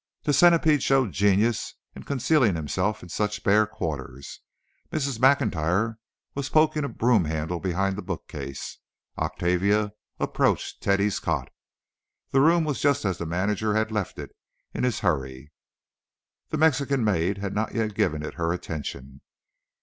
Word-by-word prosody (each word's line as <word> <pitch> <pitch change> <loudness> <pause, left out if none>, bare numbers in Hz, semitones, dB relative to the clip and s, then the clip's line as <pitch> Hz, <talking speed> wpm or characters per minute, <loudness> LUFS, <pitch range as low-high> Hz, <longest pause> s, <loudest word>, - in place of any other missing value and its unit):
The 145 - +1
centipede 160 -1 +5
showed 135 -6 +2
genius 105 +4 +1 0.2
in - - -8
concealing 130 - +2
himself 90 +7 -2
in 90 - -11
such 105 +3 -2
bare 105 +1 +4
quarters. 70 -8 -6 0.5
Mrs. 140 -6 -2
Maclntyre 110 - +2 0.3
was 140 0 -3
poking 155 -1 +3
a 140 - -2
broom 115 -6 +2
handle 80 +3 -2
behind 95 +2 -1
the - - -4
bookcase. 75 -7 -6 0.4
Octavia 100 +4 +1 0.3
approached - - 0
Teddy's 100 0 +1
cot. - - -2 0.8
The 135 - +4
room 165 +3 +4
was 150 -3 -2
just 140 -4 +2
as 95 -3 -1
the 85 - -4
manager 105 +5 0
had 110 0 0
left 105 -4 -3
it - - -7 0.4
in - - -3
his 125 -4 -1
hurry. 70 -5 -2 1.0
The 155 - -2
Mexican 140 -4 +2
maid 95 -2 +1
had 100 0 -4
not 110 +1 -2
yet 110 -2 -1
given 75 -6 0
it 75 - -5
her 85 -1 -1
attention. 70 -6 -6
105 Hz, 145 wpm, -25 LUFS, 85-130 Hz, 1.0 s, centipede